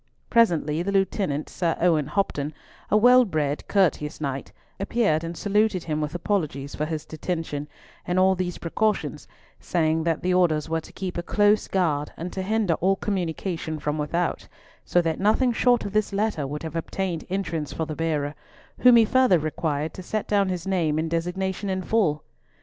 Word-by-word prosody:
Presently 170 -9 +3
the 195 +3 -2
Lieutenant, 190 -6 0
Sir 170 -2 -1
Owen 160 -5 +2
Hopton, 150 -4 -1 0.3
a 210 - +4
well 250 +3 +7
bred 150 -8 -2
courteous 165 -6 +1
knight, 140 -2 -4 0.3
appeared 195 -6 +1
and 165 0 -5
saluted 210 -2 +1
him 155 -1 -2
with 150 +2 -3
apologies 155 -7 -2
for 150 - -2
his 155 -2 -4
detention 155 -2 -4 0.4
and 180 +1 0
all 190 +1 +5
these 180 -1 -3
precautions, 215 +6 -1 0.3
saying 160 -2 0
that 165 -2 0
the 180 0 +2
orders 165 -4 +2
were 165 0 -1
to - - -14
keep 185 -2 -4
a - - -1
close 205 +4 +2
guard 155 -6 0
and 175 +2 -5
to 190 - -3
hinder 210 -2 +1
all 190 +2 +3
communication 175 -4 -3
from 150 0 -2
without, 170 +4 -1 0.4
so 175 - +2
that 160 -1 -1
nothing 220 +5 +3
short 245 0 +3
of 200 - -5
this 215 -1 +1
letter 200 -8 -1
would 150 +3 -5
have 160 -1 -6
obtained 170 0 -3
entrance 165 -6 -2
for 160 - -2
the 155 -1 -5
bearer, 150 -3 -1 0.5
whom 250 -1 +7
he 230 -1 +7
further 255 -5 +4
required 155 -1 -2
to - - -8
set 215 +4 -3
down 200 -2 +2
his 180 -2 -3
name 170 -6 +1
and 160 +1 -1
designation 190 +4 -2
in 185 0 -1
full. 175 -9 +1
175 Hz, 180 wpm, -25 LUFS, 155-195 Hz, 0.5 s, well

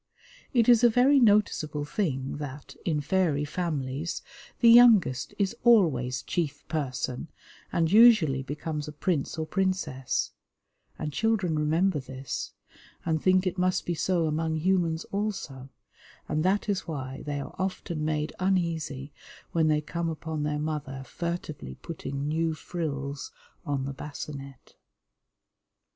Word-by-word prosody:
It 235 -4 +3
is 240 -1 +6
a 240 - +8
very 255 +5 +5
noticeable 205 - +2
thing 140 -7 -2
that, 145 -1 -7
in 155 -4 +1
fairy 150 -2 +1
families, 150 -2 -3 0.4
the 235 -1 +7
youngest 215 - +6
is 200 +2 0
always 135 - +4
chief 150 -5 -3
person, 130 -3 -3 0.4
and 165 -1 +1
usually 210 - +6
becomes 150 +2 -4
a 150 - -7
prince 155 0 -1
or 160 - -1
princess; 185 -8 -1 0.7
and 150 -1 -4
children 210 -6 +1
remember 160 +3 +2
this, 130 0 -5 0.5
and 160 -2 0
think 185 0 +3
it 185 0 -1
must 185 0 +1
be 175 - -1
so 170 +1 +1
among 160 +1 0
humans 170 -1 +1
also, 195 -11 -3 0.6
and 155 0 0
that 195 +4 +1
is 200 -3 -1
why 135 -4 -5
they 145 -1 -2
are 140 - -7
often 185 -4 -3
made 155 0 -1
uneasy 165 -7 -1 0.4
when 160 -2 +2
they 150 -1 +3
come 165 +2 -3
upon 160 -1 -4
their 150 0 -1
mother 150 -3 -4
furtively 155 - -5
putting 140 -3 -5
new 160 +1 0
frills 145 -4 -4 0.4
on 140 -2 -1
the 140 - -4
basinette. 140 -1 -8
155 Hz, 135 wpm, -28 LUFS, 145-185 Hz, 0.7 s, a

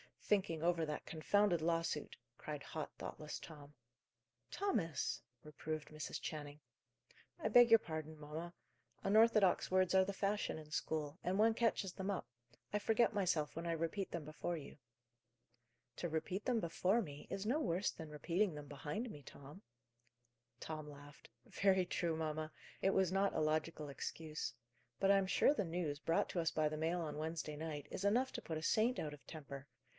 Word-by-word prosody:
"Thinking 170 -6 +1
over 170 -1 +3
that 150 -1 -4
confounded 175 +2 +2
lawsuit," 165 -2 0 0.2
cried 150 -2 -5
hot, 155 +2 -4
thoughtless 150 -1 -5
Tom. 150 -2 -11 0.8
"Thomas!" 195 - 0 0.2
reproved 155 0 -5
Mrs. 155 0 -5
Channing. 145 -1 -5 0.8
"I - - -1
beg 245 -1 +8
your 225 0 +9
pardon, 155 -3 -5
mamma. 155 +3 -6 0.5
Unorthodox 215 -2 +5
words 185 0 +3
are 190 0 +6
the 200 - -3
fashion 200 -1 0
in 155 -1 -10
school, 150 +1 -2
and 185 +2 0
one 220 +2 +5
catches 220 -4 +1
them 190 0 -3
up. 200 - -1 0.5
I 210 - +2
forget 225 +2 +3
myself 180 -7 +1
when 165 +1 -3
I 170 - +1
repeat 165 +4 -1
them 170 -3 -3
before 155 +3 -3
you." 150 - -9 1.2
"To 175 - -1
repeat 160 +5 -2
them 240 -3 +2
before 185 +6 +2
me 145 -7 -8
is 195 +1 -3
no 255 +8 +2
worse 190 - +1
than 160 -1 -8
repeating 170 +5 0
them 145 -1 -7
behind 155 - -4
me, 145 - -9
Tom." 140 +8 -11 1.0
Tom 155 -1 -5
laughed. 145 0 -13 0.2
"Very 190 -2 +3
true, 170 -2 0
mamma. 155 -1 -2 0.3
It 195 - +4
was 190 -2 +3
not 195 +1 +2
a - - 0
logical 155 0 0
excuse. 150 -2 -4 0.4
But 195 - +4
I 200 - +7
am 195 -1 +2
sure 275 - +5
the 205 - 0
news, 165 -4 -2
brought 165 +1 +1
to 175 - -1
us 165 -1 +2
by 155 -1 +2
the 155 - -4
mail 165 +3 0
on 150 -2 -4
Wednesday 155 -1 -3
night, 150 -2 -4
is 195 - -3
enough 245 +6 +3
to - - -5
put 160 - -3
a 155 - -5
saint 230 +7 +3
out 150 -1 -3
of 145 - -14
temper. 140 -3 -8
165 Hz, 175 wpm, -38 LUFS, 155-195 Hz, 1.2 s, your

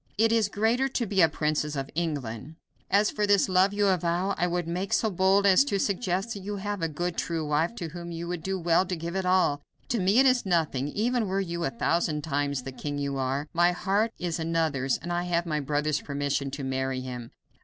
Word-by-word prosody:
It 225 +1 +4
is 225 -3 +2
greater 225 +6 +1
to 255 -2 -2
be 195 -2 +2
a 165 - +6
princess 150 0 -1
of 135 0 -4
England. 145 -4 -3 0.3
As 205 +2 +3
for 210 -1 0
this 200 -1 +4
love 185 +1 +4
you 205 0 +1
avow, 180 0 +1
I 180 - 0
would 175 -1 -2
make 180 +3 -2
so 220 - +2
bold 190 +2 +3
as 195 +5 +6
to 200 - 0
suggest 195 +1 -1
that 200 - -6
you 205 +2 -5
have 205 -1 -4
a 165 - +1
good, 175 +3 -3
true 165 -2 -2
wife 150 +8 0
to 170 -7 -5
whom 170 +1 -7
you 170 +1 -5
would 175 -1 -4
do 190 +2 -2
well 170 0 +3
to 185 - -2
give 170 +2 -5
it 190 -1 -1
all. 180 -6 +3 0.3
To 235 - 0
me 195 +4 +3
it 265 - +6
is 255 -2 +4
nothing, 160 -7 0
even 225 +6 0
were 190 +1 0
you 170 -3 -3
a - - +1
thousand 165 -8 0
times 140 -3 -1
the 135 - -6
king 145 +2 -5
you 140 -1 -2
are. 135 +3 -1
My 175 +1 +4
heart 200 +5 0
is 175 -2 -3
another's, 160 -5 0
and 175 - -5
I 175 0 -1
have 175 -1 0
my 155 -2 -1
brother's 150 +1 0
permission 140 -1 -2
to 140 +1 -6
marry 130 0 -2
him." 125 -2 -7
175 Hz, 230 wpm, -27 LUFS, 150-195 Hz, 0.3 s, a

